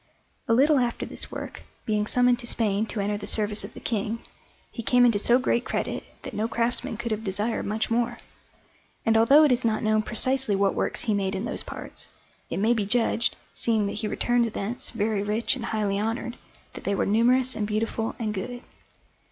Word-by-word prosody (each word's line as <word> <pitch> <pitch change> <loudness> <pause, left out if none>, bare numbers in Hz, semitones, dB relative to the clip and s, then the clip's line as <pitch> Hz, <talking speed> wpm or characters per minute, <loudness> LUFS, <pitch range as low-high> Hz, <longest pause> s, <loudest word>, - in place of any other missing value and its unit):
A 230 - +3
little 285 +3 +5
after 245 -1 -1
this - - -6
work, - - -7 0.2
being 210 -1 0
summoned 245 0 +3
to 240 - -5
Spain 220 -2 +1
to 215 - -4
enter 205 +1 0
the 205 - -6
service 210 -1 +1
of - - -9
the - - -8
King, 220 0 -2 0.5
he 230 - -5
came 245 +2 +4
into 230 -4 +3
so 240 +4 +5
great 250 -2 +1
credit - - -2 0.2
that - - -7
no 215 +2 -1
craftsman 230 -1 -1
could 235 0 -4
have 215 0 -2
desired 210 +3 -1
much 215 +2 -1
more; 240 +1 +1 0.9
and 225 -1 +3
although 270 +7 +7
it 295 - +5
is 250 0 +2
not 220 -2 +1
known 215 0 +3
precisely 255 0 +1
what 195 0 +2
works - - -1
he 220 - +1
made 195 -1 0
in 190 +4 -3
those - - -3
parts, - - -7 0.4
it - - -3
may 220 +4 +3
be 220 -3 0
judged, 230 +1 +1 0.2
seeing 220 -3 +1
that 200 - -2
he 215 - -1
returned 240 +1 +1
thence 220 +5 -2
very 215 -2 -1
rich 215 +6 +1
and 240 -3 -5
highly 205 -3 -1
honoured, 225 +3 -2 0.4
that - - -9
they 200 - 0
were - - +1
numerous 245 +5 +3
and 210 - -1
beautiful 220 +1 -2
and 215 -2 -2
good. 240 +5 -5
225 Hz, 205 wpm, -26 LUFS, 210-240 Hz, 0.9 s, although